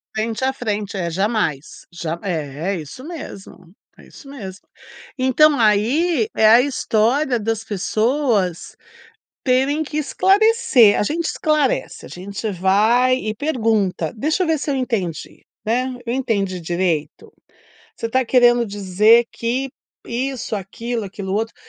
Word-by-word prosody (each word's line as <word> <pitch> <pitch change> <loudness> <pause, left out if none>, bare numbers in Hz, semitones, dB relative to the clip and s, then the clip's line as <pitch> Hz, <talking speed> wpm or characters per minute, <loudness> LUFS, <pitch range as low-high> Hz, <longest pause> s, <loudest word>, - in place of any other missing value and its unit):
Frente 225 +3 -2
a 265 - +2
frente. 210 -5 -3
É 170 -2 -2
jamais. 190 - -2
Já 170 -1 -5
é 160 -1 -3
é - - -2
isso 155 - -11
mesmo 200 - -10 0.3
é - - -16
isso 275 - -14
mesmo. 200 -9 -9 0.6
Então 280 +3 +4
aí 255 - +2
é 220 - +3
a 235 +2 +7
história 250 0 +1
das 225 +1 -2
pessoas 215 - -1 0.7
terem 270 +4 +2
que 300 0 -4
esclarecer. 380 - +4
A - - +2
gente 325 +9 -1
esclarece, 305 -5 -1
a - - -10
gente 200 +4 -5
vai 215 +7 +3
e 215 -4 -3
pergunta: 220 - 0
"Deixa 310 - 0
eu 360 - 0
ver 320 -2 +1
se 290 - -3
eu 275 - 0
entendi." 215 - -4 0.2
Né, 250 +4 -1
"Eu 235 - -1
entendi 200 -8 -1
direito? 170 -2 -2 0.7
Você 230 - -4
tá 260 +3 +2
querendo 240 -1 +4
dizer 205 +3 +3
que 250 +3 -2 0.4
isso, 250 -1 -3
aquilo, 225 +4 -4
aquilo 195 -1 -6
outro." 225 +2 -2
225 Hz, 140 wpm, -20 LUFS, 195-265 Hz, 0.7 s, a